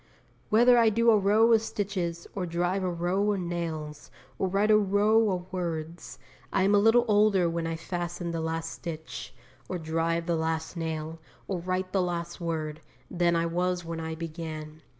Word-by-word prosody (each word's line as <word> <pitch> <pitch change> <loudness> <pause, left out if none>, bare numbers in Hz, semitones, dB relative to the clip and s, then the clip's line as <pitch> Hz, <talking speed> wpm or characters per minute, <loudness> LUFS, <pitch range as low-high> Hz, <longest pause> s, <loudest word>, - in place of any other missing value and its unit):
Whether 240 +3 +6
I 230 -1 +5
do 230 +2 +4
a 215 - +5
row 215 +4 +4
of 220 - +5
stitches, 185 -6 -3
or 185 -3 -3
drive 175 +3 0
a 185 - 0
row 180 +4 0
of 200 - -2
nails, 165 -4 -4 0.3
or 190 - +1
write 200 +3 +2
a - - +7
row 210 +2 +3
of 180 -1 -4
words, 165 -7 -4 0.3
I 190 - +2
am 200 +2 +3
a 205 - +6
little 225 +3 +5
older 205 -4 +4
when 165 0 -2
I 165 - -2
fasten 175 0 -4
the 165 -1 -2
last 165 0 -3
stitch, 160 -1 -7 0.4
or 185 - -2
drive 165 +1 -1
the 170 -1 0
last 160 +1 -2
nail, 160 -1 -4 0.3
or 190 -3 -2
write 185 +1 -2
the 195 - +3
last 175 -1 -3
word, 155 -2 -3 0.3
than 175 -1 +2
I 165 0 +1
was 180 +1 -1
when 165 0 -4
I 160 0 -4
began. 155 -1 -7
175 Hz, 185 wpm, -28 LUFS, 165-195 Hz, 0.4 s, a